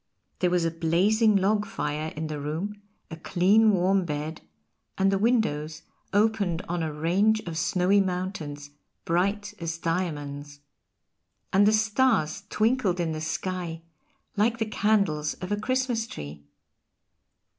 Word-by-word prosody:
There 180 - +2
was 175 -1 +1
a 165 - +1
blazing 190 +7 +2
log 205 +2 +2
fire 155 -5 -3
in 155 +1 -3
the 155 -1 -4
room, 170 +9 -4 0.3
a - - -4
clean 195 +7 +3
warm 190 0 +2
bed, 155 0 -4 0.6
and 195 0 +3
the 195 - +1
windows 165 -9 0 0.3
opened 205 -4 +1
on 175 0 -2
a 160 -1 -2
range 185 +8 +2
of 170 -4 -6
snowy 180 +4 +2
mountains, 180 -6 -4 0.3
bright 200 +5 0
as 165 -1 -3
diamonds. 145 -4 -3 0.9
And 200 +2 +5
the - - +5
stars 215 -5 +1
twinkled 215 -5 +1
in 170 -2 0
the 155 0 -4
sky 165 +1 -4 0.5
like 225 +3 +2
the 225 - 0
candles 200 -9 +1
of 180 +2 -7
a - - +3
Christmas 245 +1 -1
tree. 75 - -9
180 Hz, 135 wpm, -26 LUFS, 160-210 Hz, 0.9 s, And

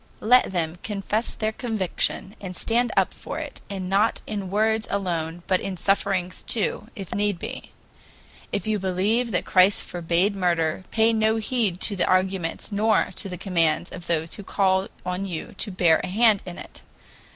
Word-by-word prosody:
Let 250 0 +5
them 170 -1 -2
confess 210 +2 -2
their 215 0 -1
conviction, 215 -3 -2
and 185 -2 -6
stand 235 +4 +1
up - - +3
for - - -7
it, - - -6
and 190 -2 -4
not 200 +4 +2
in 200 -3 -4
words 220 +2 +1
alone, 175 -4 -2
but 185 -1 +1
in 190 -2 -4
sufferings 195 -1 0
too, 485 0 -2
if 195 -5 -6
need 205 -2 0
be. - - -7 0.8
If 200 - -2
you 215 -1 0
believe 195 +6 +1
that 180 - -1
Christ 185 +2 +5
forbade 175 +4 0
murder, 175 -2 0
pay 225 0 +3
no 220 0 +2
heed 220 -4 0
to 205 - +3
the 185 - +1
arguments 185 0 0
nor 215 +2 +2
to 195 - -6
the 180 - -5
commands 170 -3 +1
of 175 -1 -9
those 165 -1 0
who 205 - -7
call 190 -1 +1 0.2
on 180 +2 -2
you 175 -4 -5
to 205 - -1
bear 175 -4 +3
a - - -2
hand 215 +1 +4
in 175 - -7
it. - - -11
195 Hz, 175 wpm, -24 LUFS, 180-215 Hz, 0.8 s, Let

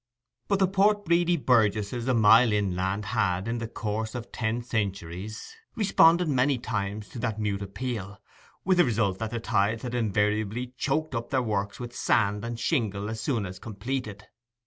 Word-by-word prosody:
But 200 - +2
the 190 -1 +3
Port 205 +2 +2
Bredy 175 0 +3
burgesses 115 -2 +1
a 130 - +2
mile 115 +2 +6
inland 100 0 -1
had, 95 -3 0
in 115 +1 -2
the 115 - -4
course 110 0 -4
of 120 -1 -6
ten 115 +1 -2
centuries, 100 - -4 0.2
responded 175 -6 +4
many 135 -1 +2
times 105 -3 -3
to 125 - -8
that 110 -2 -2
mute 105 -2 -1
appeal, 100 -1 -5 0.5
with 185 -1 +3
the - - +8
result 105 -6 0
that 110 - -2
the 115 +1 -3
tides 110 +1 0
had 125 -1 -4
invariably 110 +2 0
choked 155 +2 -1
up 115 -1 -3
their 130 -2 +1
works 100 -3 -2
with 120 -1 -7
sand 105 -2 +1
and 115 0 -4
shingle 110 - -1
as 110 -1 -5
soon 115 -5 -1
as 95 0 -8
completed. 110 -1 -5
115 Hz, 170 wpm, -27 LUFS, 105-125 Hz, 0.5 s, the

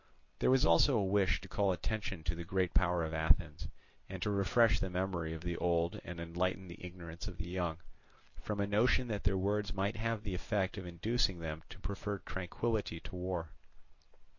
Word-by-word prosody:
There - - +3
was 130 0 +5
also 85 - +5
a 100 - +2
wish 95 0 +2
to - - -9
call 100 -2 +2
attention 95 -1 -3
to 80 - 0
the 85 0 -5
great 90 +1 0
power 90 -2 +3
of 80 0 -3
Athens, 80 0 +2 0.4
and 95 -1 -5
to 105 - +1
refresh 100 +4 +4
the 95 - -1
memory 90 -3 -1
of 80 -1 -5
the 85 0 -2
old 85 -1 +1
and 90 -1 -7
enlighten 90 +2 -1
the 85 - -10
ignorance 85 +1 -7
of 90 - -7
the 85 0 -4
young, 90 -3 -1 0.6
from 105 -1 -3
a 100 - +2
notion 115 +4 +3
that 105 -2 -3
their 100 -1 +3
words 100 +1 0
might 100 +3 0
have 115 -1 -1
the 100 -3 -3
effect 95 +1 0
of 95 - -7
inducing 95 +3 +1
them 80 -1 -4
to - - -10
prefer 100 +2 -3
tranquillity 95 0 -2
to - - -8
war. 90 -3 -3
95 Hz, 195 wpm, -34 LUFS, 85-100 Hz, 0.6 s, was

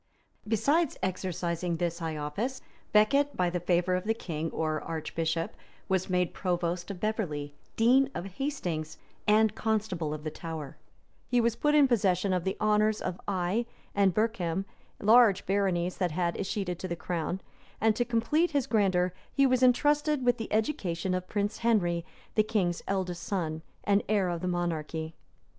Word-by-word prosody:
Besides 280 - +2
exercising 175 -2 -2
this 170 0 -2
high 160 -2 -3
office, 195 - -3 0.3
Becket 280 +7 +3
by 180 -1 +2
the 180 - -1
favor 175 +1 +1
of 180 +1 -1
the 225 +1 +1
king 165 -6 -4
or 155 -1 -1
archbishop, 165 +1 -2 0.3
was 190 0 0
made 180 -1 +1
provost 175 -1 -1
of 195 -3 -5
Beverley, 165 -10 -2 0.2
dean 255 +4 +4
of 175 - -3
Hastings, 180 - -3 0.3
and 215 0 +5
constable 210 -8 -1
of 150 0 -5
the 155 - -3
Tower: 160 -3 -6 0.5
he 245 - +2
was 235 -1 +2
put 295 +5 +2
in 290 -2 +6
possession 195 -5 +2
of 180 -2 -1
the 190 - -1
honors 215 0 +3
of 185 -1 -4
Eye 195 +4 0 0.3
and 200 -1 +4
Berkham 195 -4 0 0.3
large 220 -2 +5
baronies 185 -3 0
that 180 -2 +1
had 170 +1 0
escheated 190 -3 -3
to 185 - -4
the 170 - -3
crown; 175 +1 -3 0.4
and 220 0 +3
to 240 - +2
complete 245 +9 +1
his 280 -5 0
grandeur, 190 -5 +2 0.2
he 275 - +3
was 255 -1 +3
intrusted 290 +2 +3
with 245 -1 +4
the 225 - -5
education 195 - 0
of 185 0 -3
Prince 205 0 -1
Henry, 175 -8 +2 0.3
the 215 - +4
king's 205 -6 0
eldest 180 -3 -2
son, 165 -4 -2 0.2
and 200 0 +3
heir 200 -4 +2
of 170 -1 -3
the 185 - -2
monarchy. 165 -2 -2
190 Hz, 165 wpm, -29 LUFS, 170-220 Hz, 0.5 s, in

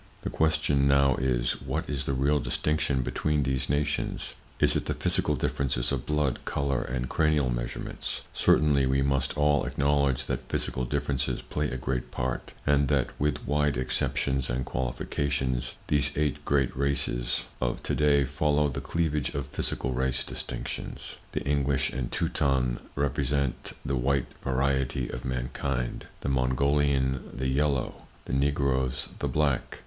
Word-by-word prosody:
The - - -2
question 75 -3 +2
now 70 -1 +5
is: - - 0
What - - -2
is 70 -2 -2
the 70 - 0
real 70 +3 +3
distinction 70 +1 0
between 75 +3 0
these 65 0 -1
nations? 75 +1 -1 0.3
Is - - +3
it - - 0
the - - -1
physical - - +1
differences 65 -3 0
of 65 -3 -2
blood, 75 -4 +1
color 70 -2 0
and 60 0 -2
cranial 75 -4 +2
measurements? - - -4
Certainly 70 -3 +4
we 65 +1 +2
must 70 0 0
all 75 0 +3
acknowledge 70 -2 +1
that - - -3
physical 65 - 0
differences 70 0 -1
play 75 -1 -2
a 65 - -3
great 65 -1 -2
part, 65 0 -3
and 70 -1 +4
that, 70 -3 +1
with 75 -2 0
wide 75 -2 +2
exceptions 65 +1 0
and 65 +1 -1
qualifications, 65 0 -1
these 70 -1 +2
eight 75 -1 0
great 70 -3 +2
races 65 -3 0 0.2
of - - -1
to - - -1
day 70 -2 +4
follow 75 +2 +2
the 70 0 -4
cleavage 75 -3 -1
of 70 -1 -3
physical 65 -2 -2
race 65 0 0
distinctions; - - -6 0.2
the - - -1
English 70 -1 +1
and 65 -2 -3
Teuton 65 -4 +1 0.2
represent 70 -1 0
the 70 - 0
white 70 +1 +1 0.2
variety 65 -1 0
of 65 - -5
mankind; 65 0 -2
the - - -3
Mongolian, 65 0 +2
the 65 +1 -2
yellow; 70 -1 0 0.2
the - - -5
Negroes, 70 -2 +1
the 70 - -1
black. 70 -1 0
70 Hz, 150 wpm, -28 LUFS, 65-70 Hz, 0.3 s, now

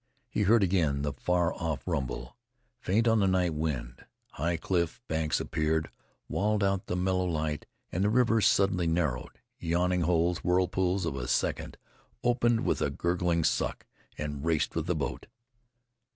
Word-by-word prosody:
He - - -2
heard 105 +2 +5
again 80 -7 +1
the 75 -1 -1
far 90 +5 +1
off 80 -5 -3
rumble, 65 -1 -3 0.4
faint 110 0 +1
on 115 -1 +4
the 100 - +3
night. 90 -3 +2 0.8
High 85 +3 -1
cliff 85 -2 -1
banks 80 -1 0
appeared, 80 0 -1 0.4
walled 105 0 +1
out 95 -1 0
the - - -1
mellow, 90 0 +1
light, 75 -3 -2 0.2
and 90 - 0
the 105 - +3
river 115 -1 +3
suddenly 95 -4 +3
narrowed. 80 -7 -1 0.2
Yawning 90 +2 +1
holes, 85 +1 +2
whirlpools 90 0 +1
of 75 - -2
a 60 -2 -4
second, - - -1 0.5
opened 120 -1 +2
with - - +1
a - - +2
gurgling 85 -1 0
suck - - 0 0.3
and 75 -2 -4
raced 80 -2 +1
with 80 0 -2
the 90 - +1
boat. 75 -2 -4
90 Hz, 150 wpm, -29 LUFS, 80-95 Hz, 0.8 s, heard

